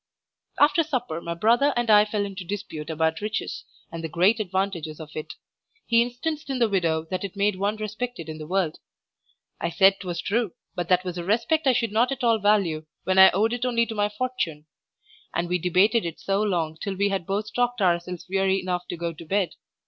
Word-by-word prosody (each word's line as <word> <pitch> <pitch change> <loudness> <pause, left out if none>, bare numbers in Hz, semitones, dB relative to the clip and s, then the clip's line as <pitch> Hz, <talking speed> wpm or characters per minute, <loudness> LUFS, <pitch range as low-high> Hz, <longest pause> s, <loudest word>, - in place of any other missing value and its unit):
After 295 +3 +5
supper 250 - -2
my 170 0 -4
brother 235 +10 +3
and 240 -1 0
I 210 0 +7
fell 210 -1 -1
into 195 -2 -6
dispute 175 -5 -6
about 160 +1 0
riches, 210 +1 -3 0.3
and 165 0 -6
the 160 - -3
great 185 +8 +3
advantages 190 -6 -2
of 155 -2 -9
it; 155 - -5 0.5
he 230 0 +4
instanced 290 +6 -3
in 270 - -1
the 235 -2 +3
widow 165 -6 0
that 185 - -2
it 200 -1 -5
made 200 -1 +1
one 200 +2 0
respected 215 -3 -5
in 155 0 -7
the 155 - -7
world. 180 -3 0 0.8
I 170 - -1
said 195 +2 +5
'twas 175 -3 -4
true, 215 -2 -1 0.2
but 175 -2 -4
that 180 0 +4
was 180 -1 -4
a - - -4
respect 240 - +1
I 260 - +6
should 230 -3 0
not 235 +5 +2
at 270 -1 -4
all 230 -2 +3
value 190 -7 +2 0.2
when 190 0 +2
I 190 - +10
owed 220 +5 +1
it 245 0 -3
only 235 -2 +2
to 230 - -6
my 205 -1 +1
fortune. 210 -10 -3 0.7
And 170 +1 0
we 180 +1 0
debated 190 +6 +3
it 165 -2 -5
so 195 +1 0
long 170 -6 -1
till 200 -2 -3
we 200 +2 +1
had 195 -4 -2
both 210 +2 -2
talked 245 0 0
ourselves 175 -2 0
weary 195 0 +1
enough 180 -1 -3
to 175 - -5
go 170 0 -3
to 160 - -11
bed. 190 +1 0
195 Hz, 215 wpm, -25 LUFS, 170-225 Hz, 0.8 s, I